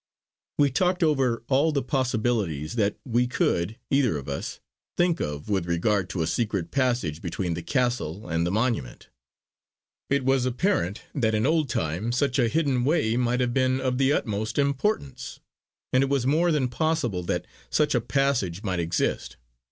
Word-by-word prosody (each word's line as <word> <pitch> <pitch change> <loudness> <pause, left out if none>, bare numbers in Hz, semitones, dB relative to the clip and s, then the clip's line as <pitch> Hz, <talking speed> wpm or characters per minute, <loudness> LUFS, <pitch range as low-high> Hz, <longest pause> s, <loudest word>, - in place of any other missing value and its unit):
We 145 -2 +4
talked 180 +5 +1
over 135 -7 +1
all 140 +4 +3
the 140 -2 0
possibilities 115 - -1
that 105 -4 0
we 125 0 +1
could 105 -4 0
either 135 - +3
of 70 - -8
us 70 0 -4 0.4
think 175 -1 +2
of 75 0 -4
with 95 -5 0
regard 90 +2 +1
to 85 - -1
a - - 0
secret 95 -1 -1
passage 120 - 0
between 90 0 -2
the 85 - -4
castle 120 - -1
and 85 -1 0
the 85 - 0
monument. 110 - -2 1.0
It 140 -1 +1
was 135 -1 +2
apparent 125 - 0
that 110 -7 +1
in 110 - +1
old 155 -2 +2
time 85 +8 -1
such 130 +2 +1
a 120 - +4
hidden 140 -4 +1
way 140 -6 +2
might 125 0 +1
have 120 -1 0
been 130 0 +2
of 130 -1 -1
the 135 0 +3
utmost 110 -5 -1
importance; 140 -2 -1 0.5
and 130 - +5
it 135 - -1
was 140 -3 +1
more 165 +6 +3
than 145 -5 +1
possible 125 - -1
that - - -1 0.2
such - - +2
a - - +2
passage 120 -10 0
might 95 -4 -1
exist. 85 0 -1
120 Hz, 170 wpm, -26 LUFS, 95-135 Hz, 1.0 s, and